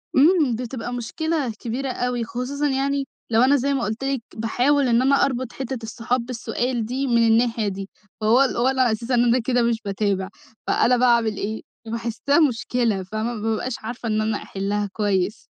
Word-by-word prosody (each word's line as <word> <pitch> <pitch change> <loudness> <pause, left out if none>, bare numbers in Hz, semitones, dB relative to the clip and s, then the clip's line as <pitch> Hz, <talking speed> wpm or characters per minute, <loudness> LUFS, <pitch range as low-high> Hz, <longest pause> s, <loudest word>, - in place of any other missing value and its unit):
إمم، 295 -4 +4
بتبقى 245 0 -5
مشكلة 285 +2 -2
كبيرة 255 +3 -3
أوي، 245 -1 -1
خصوصًا 250 +6 -2
يعني 275 0 0 0.2
لو 225 +1 +3
أنا 270 +3 +5
زي 280 +1 +1
ما 265 - -1
قُلت 220 +4 -3
لِك، 270 -3 -1
باحاول 255 +5 +2
إن 235 +1 +3
أنا 275 +1 +4
أربُط 255 -2 -3
حتّة 265 -1 -4
الصحاب 235 +2 -2
بالسؤال 240 -1 -2
دي 265 +4 -2
من 235 -1 +3
الناحية 225 -1 +2
دي، 195 0 -5 0.3
فهو 230 +5 +4
ال 270 - +1
هو 245 +2 +2
اللي 265 -1 +1
علي 245 -3 +4
أساس 230 +3 -3
إن 240 -1 +4
أنا 240 +1 +3
كده 245 +1 +1
مش 235 -1 +1
باتابع، 195 -1 -1 0.4
فأنا 250 +1 +3
باعمل 235 -4 +3
إيه، 215 +2 -3 0.3
باحسها 230 +6 0
مشكلة. 230 -4 -1
فاهمة؟ 215 +5 -3
ما 215 - -6
بابقاش 225 +3 -1
عارفة 235 +1 -6
إن 215 0 +1
أنا 215 -1 0
أحلّها 200 +1 -2
كويس. 205 -1 0
240 Hz, 185 wpm, -23 LUFS, 220-260 Hz, 0.4 s, أنا